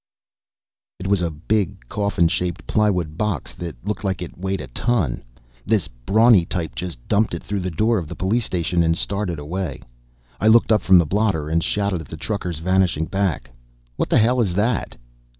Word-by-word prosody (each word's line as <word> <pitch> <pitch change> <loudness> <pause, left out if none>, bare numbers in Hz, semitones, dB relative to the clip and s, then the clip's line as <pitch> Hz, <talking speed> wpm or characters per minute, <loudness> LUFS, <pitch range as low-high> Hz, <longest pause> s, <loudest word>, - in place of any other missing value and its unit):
It 95 - -8
was 100 -1 +2
a 85 - 0
big, 80 - -2
coffin 100 - +1
shaped 85 0 -2
plywood 90 -7 0
box 105 -10 -2
that 85 -4 -6
looked 105 +1 -3
like 95 -2 -1
it 90 - -9
weighed 95 +1 -3
a - - -5
ton. 85 - -1 0.4
This 110 -5 +1
brawny 100 - +4
type 85 -1 -3
just 90 -5 -5
dumped 105 -3 +2
it 85 - -7
through 100 -1 -2
the 95 0 -2
door 110 +6 +1
of 85 - -6
the - - -7
police 110 +5 0
station 85 -1 0
and 80 0 +2
started 100 -4 -2
away. 80 0 -4 0.6
I 105 - +2
looked 115 +1 +5
up 105 - +4
from 95 -1 +6
the 85 - +4
blotter 95 -4 0
and 80 +1 +1
shouted 100 -4 -1
at - - -11
the 80 - -8
trucker's 90 -1 -3
vanishing 90 -1 +1
back. 90 -10 -2 0.4
"What - - -1
the - - +4
hell 120 +3 +3
is 95 -6 0
that?" 110 +2 0
95 Hz, 190 wpm, -22 LUFS, 80-105 Hz, 0.6 s, from